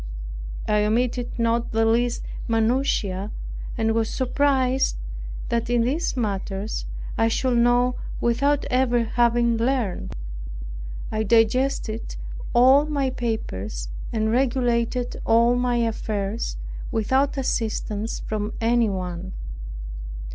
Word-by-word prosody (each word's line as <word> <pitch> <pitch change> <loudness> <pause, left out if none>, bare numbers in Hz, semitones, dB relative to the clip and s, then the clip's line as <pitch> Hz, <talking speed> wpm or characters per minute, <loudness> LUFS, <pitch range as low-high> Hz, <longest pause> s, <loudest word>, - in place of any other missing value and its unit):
I 210 0 +3
omitted 245 +3 0
not 230 0 +1
the 225 0 +3
least 235 +2 +2 0.2
minutia, 225 -4 +1 0.5
and 225 -1 +2
was 225 -1 +1
surprised 265 0 +2 0.5
that 235 0 0
in 240 -1 +3
these 270 +3 0
matters 200 -1 -2 0.3
I 225 - +5
should 240 +1 +2
know 245 +1 +3 0.2
without 275 +5 +2
ever 250 -2 +3
having 235 0 +2
learned. 235 -5 -1 1.0
I 215 - 0
digested 225 +1 +2 0.4
all 260 +4 +6
my 280 -3 0
papers, 100 - -3 0.2
and 220 -1 +1
regulated 245 -1 +1
all 235 +2 +4
my 245 0 +1
affairs, 220 -2 -1 0.3
without 260 +5 +2
assistance 220 -4 -1
from 215 0 -3
any 235 0 +3
one. 185 -1 -4
235 Hz, 105 wpm, -24 LUFS, 220-250 Hz, 1.0 s, all